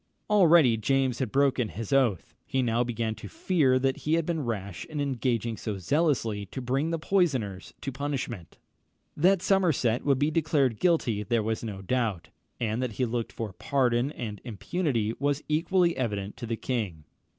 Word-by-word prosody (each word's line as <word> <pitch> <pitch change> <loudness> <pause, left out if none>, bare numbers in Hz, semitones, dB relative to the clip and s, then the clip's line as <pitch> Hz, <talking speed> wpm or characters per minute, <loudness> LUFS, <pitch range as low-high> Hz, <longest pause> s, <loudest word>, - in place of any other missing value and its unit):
Already 170 - +6
James 130 +2 +1
had 130 -6 -2
broken 135 -4 +2
his 110 +2 -5
oath. 120 -10 +2
He 130 -1 0
now 120 0 +2
began 115 -2 -2
to - - -9
fear 175 - +2
that 135 0 +1
he 155 +2 0
had 165 -1 0
been 160 -3 -1
rash 100 -7 -4
in 150 - -6
engaging 120 -4 -1
so 105 -3 -4
zealously 115 - 0
to 130 - -6
bring 135 +5 0
the 165 - 0
poisoners 140 - 0
to 135 - -3
punishment. 135 - -4 0.6
That 185 +4 +3
Somerset 160 - +2
would 140 -2 +3
be 145 +3 +1
declared 145 -7 +1
guilty 145 - +2
there 115 +1 0
was 110 +1 -2
no 100 -4 -6
doubt, 110 -5 -1 0.3
and 115 0 -1
that 125 -3 -2
he 125 - 0
looked 115 -1 -3
for 110 -4 -5
pardon 130 0 +1
and 105 -4 -6
impunity 115 - -1
was 145 +1 0
equally 170 +3 +2
evident 105 -5 -3
to 120 - -6
the 115 0 -2
king. 105 -13 -3
125 Hz, 175 wpm, -28 LUFS, 110-145 Hz, 0.6 s, Already